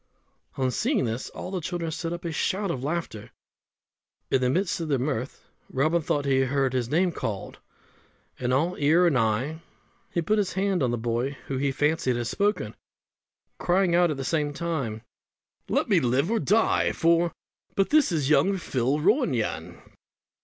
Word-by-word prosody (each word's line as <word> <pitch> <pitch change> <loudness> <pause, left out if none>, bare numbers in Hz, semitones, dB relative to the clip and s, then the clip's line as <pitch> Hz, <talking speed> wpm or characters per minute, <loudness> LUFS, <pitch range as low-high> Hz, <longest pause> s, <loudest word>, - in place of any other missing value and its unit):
On 130 -1 +1
seeing 125 - +1
this 115 +2 -3
all 185 - -7
the 185 -2 -2
children 170 0 -3
set 165 +1 -4
up 175 0 -5
a 170 - -2
shout 190 +5 -1
of 130 -4 -4
laughter. 150 -8 -3 1.0
In 130 - +3
the 125 - +2
midst 180 +6 0
of 165 - -3
their 140 -3 +1
mirth 130 -1 -3 0.2
Robin 155 +6 +1
thought 145 -1 -1
he 135 -1 +3
heard 135 0 +1
his 125 -2 -1
name 175 +5 +2
called; 105 -10 -5 0.8
and 125 0 -1
all 160 +8 +1
ear 160 +5 +4
and 165 -5 +3
eye, 125 +7 0 0.5
he 170 - -1
put 215 +6 +2
his 200 -3 -1
hand 195 -2 0
on 130 - +2
the 120 - -1
boy 120 +4 -2
who 135 - -3
he 140 0 +1
fancied 145 -2 +1
had 120 0 -2
spoken, 200 - -1 0.8
crying 180 0 +2
out 175 0 +4
at 150 - -2
the 135 - -3
same 150 +1 0
time, 140 -10 -3 0.7
"Let - - +1
me - - +4
live 130 - +1
or 230 - +2
die 220 +2 +2
for 170 +1 +3
it, - - -8 0.4
but 195 - +1
this 300 -8 +4
is 150 -5 0
young 155 +7 +3
Phil 135 -5 0
Ronayne." 170 - 0
150 Hz, 180 wpm, -26 LUFS, 130-175 Hz, 1.0 s, ear